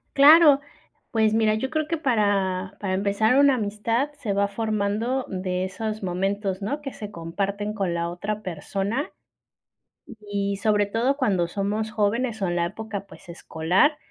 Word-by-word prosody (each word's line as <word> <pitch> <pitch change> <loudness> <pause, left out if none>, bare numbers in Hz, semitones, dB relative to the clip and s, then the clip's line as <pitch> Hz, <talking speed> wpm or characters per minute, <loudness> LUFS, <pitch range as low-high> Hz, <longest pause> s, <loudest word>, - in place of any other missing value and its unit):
Claro, 295 0 +8 0.5
pues 220 -1 +2
mira, 220 -1 +3
yo 265 +6 -3
creo 310 -1 -1
que 330 - -1
para 200 -8 0
para 190 -2 -2
empezar 200 +4 +2
una 280 -2 +5
amistad 225 +5 -1
se 220 -7 -3
va 200 0 +2
formando 220 +4 -1
de 185 -1 -2
esos 215 +2 -4
momentos, 195 +2 -2
¿no?, 280 +9 -3
que 275 - -5
se 210 - -7
comparten 200 +5 -3
con 195 -5 -1
la 170 0 -1
otra 200 +5 -4
persona 195 - -3 1.1
y 200 -1 -2
sobre 205 0 +2
todo 235 +7 0
cuando 195 -11 +1
somos 205 +4 -2
jóvenes 220 +2 0
o 190 - +1
en 175 - -1
la 170 - +2
época, 205 +1 -6
pues, 175 - -15
escolar, 175 - +1
205 Hz, 155 wpm, -24 LUFS, 195-230 Hz, 1.1 s, Claro